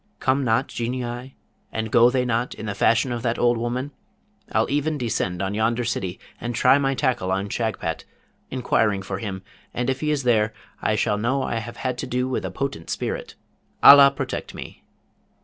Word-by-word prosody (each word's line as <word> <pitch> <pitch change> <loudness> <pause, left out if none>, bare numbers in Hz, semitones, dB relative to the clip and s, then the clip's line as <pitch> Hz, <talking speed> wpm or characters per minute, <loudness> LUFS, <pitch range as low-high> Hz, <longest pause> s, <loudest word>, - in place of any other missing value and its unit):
come 135 +1 +1
not 120 +2 +2
Genii, 120 +1 -4 0.3
and 110 0 -3
go 120 0 +6
they 125 0 0
not, 120 0 -1
in - - -7
the 105 - -2
fashion 115 +5 +2
of 120 -1 -3
that 115 -1 -1
old 120 0 +3
woman? 120 +4 -3 0.6
I'll - - +2
even 145 +2 0
descend 95 -7 -2
on 95 +1 -2
yonder 115 +3 +1
city, 95 -5 -3 0.2
and 120 0 -4
try 130 +3 +5
my 135 -1 +1
tackle 120 -8 0
on 95 +2 -1
Shagpat, 110 0 -2 0.5
inquiring 110 -6 +1
for 95 +1 -4
him, 95 -3 -5 0.3
and 125 +2 0
if 130 - -4
he 150 - -1
is 145 -3 0
there, 110 -3 +2 0.3
I 110 - +1
shall 105 -1 0
know 130 +5 0
I 115 - -2
have 115 +1 -8
had 125 -1 -3
to 135 - -3
do 125 0 -1
with 130 - -2
a - - -3
potent 135 -12 -4
spirit. - - -4 0.5
Allah 140 0 +10
protect 140 - -5
me!' - - -9
120 Hz, 190 wpm, -23 LUFS, 110-130 Hz, 0.6 s, Allah